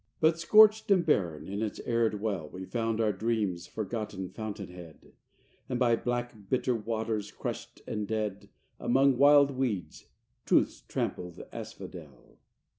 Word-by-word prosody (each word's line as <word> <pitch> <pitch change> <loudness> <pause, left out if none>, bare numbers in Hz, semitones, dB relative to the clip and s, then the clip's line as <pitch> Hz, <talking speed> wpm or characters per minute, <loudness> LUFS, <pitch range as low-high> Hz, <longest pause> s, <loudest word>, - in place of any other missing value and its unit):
IV 105 +4 -46
But, 160 +1 +3
scorched 215 +5 +6
and 185 -4 +4
barren, 85 - +1
in 100 +2 -4
its 110 -2 -3
arid 115 -3 +1
well, 95 -8 -2
We 95 +1 -7
found 115 +1 -1
our 110 -2 +2
dreams' 100 -5 -1
forgotten 105 -3 -4
fountain 105 -3 -6
head; 85 -3 -13 0.6
And 125 - -1
by 120 -2 +4
black, 120 -4 -4
bitter 130 0 +1
waters, 110 -1 -2
crushed - - -6
and 105 -1 -3
dead, 105 -2 -3 0.3
Among 135 +2 +3
wild 140 +1 +6
weeds, 125 -9 -3 0.4
Truth's - - +2
trampled 90 -2 -3
asphodel. - - -10
110 Hz, 140 wpm, -30 LUFS, 100-125 Hz, 0.6 s, scorched